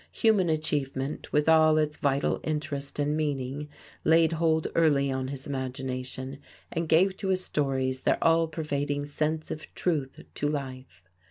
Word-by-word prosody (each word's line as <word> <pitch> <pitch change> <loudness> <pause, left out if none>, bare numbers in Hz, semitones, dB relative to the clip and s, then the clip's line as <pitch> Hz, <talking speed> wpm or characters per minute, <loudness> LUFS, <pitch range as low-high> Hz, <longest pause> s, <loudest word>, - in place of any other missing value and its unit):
Human 210 -6 +3
achievement, 145 -3 -2
with 150 +1 +2
all 155 -1 +6
its 150 -1 +1
vital 140 0 +1
interest 150 -2 -3
and 145 +1 +1
meaning, 145 -1 -2 0.3
laid 165 0 +5
hold 160 -1 +1
early 145 -4 +3
on 130 0 -2
his 135 0 -6
imagination 130 0 -4 0.3
and 165 -1 -2
gave 185 +4 +4
to 195 - -4
his 185 -1 +1
stories 130 -4 -1
their - - +2
all 165 0 +4
pervading 145 -2 -2
sense 155 +2 -2
of 155 - -7
truth 150 -7 -1
to 145 - -1
life. 130 -8 -6
150 Hz, 150 wpm, -28 LUFS, 135-160 Hz, 0.3 s, all